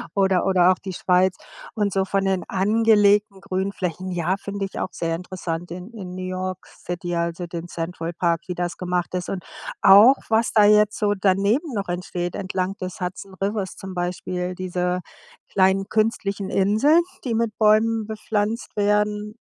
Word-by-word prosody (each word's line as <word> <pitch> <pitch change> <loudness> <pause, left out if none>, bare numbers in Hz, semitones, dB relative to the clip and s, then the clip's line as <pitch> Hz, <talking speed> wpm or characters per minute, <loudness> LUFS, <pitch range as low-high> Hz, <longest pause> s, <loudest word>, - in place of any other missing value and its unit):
oder 190 -2 +2
oder 185 -1 +5
auch 185 - 0
die 190 -2 -6
Schweiz. 185 +1 +2 0.4
Und 205 -3 0
so 190 -1 +2
von 195 0 0
den 190 -1 0
angelegten 205 0 +3
Grünflächen, 185 -1 -3
ja, 175 +1 0
finde 200 0 -4
ich 195 - -7
auch - - -2
sehr 165 -1 -2
interessant. 175 -1 -5
In 180 +5 -8
in 185 -5 -8
New 185 - -5
York 185 0 -3
City, 175 0 -5
also, 170 +1 -2
den 170 0 -6
Central 165 0 -4
Park, 170 -1 0
wie 180 - -4
das 175 0 -2
gemacht 180 -1 -2
ist. 180 -1 -3
Und 185 -3 -4 0.4
auch, 215 +8 +8
was 225 +1 +2
da 210 -2 +6
jetzt 210 0 +4
so 205 -1 +2
daneben 200 - +2
noch 200 -2 -3
entsteht 175 0 -3
entlang 185 0 -2
des 185 -1 -5
Hudson 185 +2 -5
Rivers 200 -1 -2
zum 190 -1 -8
Beispiel, 180 0 -3
diese 180 0 -2 0.5
kleinen 190 0 +2
künstlichen 205 -3 0
Inseln, 220 - +4 0.2
die 240 -4 -1
mit 225 -2 -1
Bäumen 220 +1 +3
bepflanzt 215 +1 -3
werden 210 0 0
190 Hz, 165 wpm, -23 LUFS, 180-210 Hz, 0.5 s, auch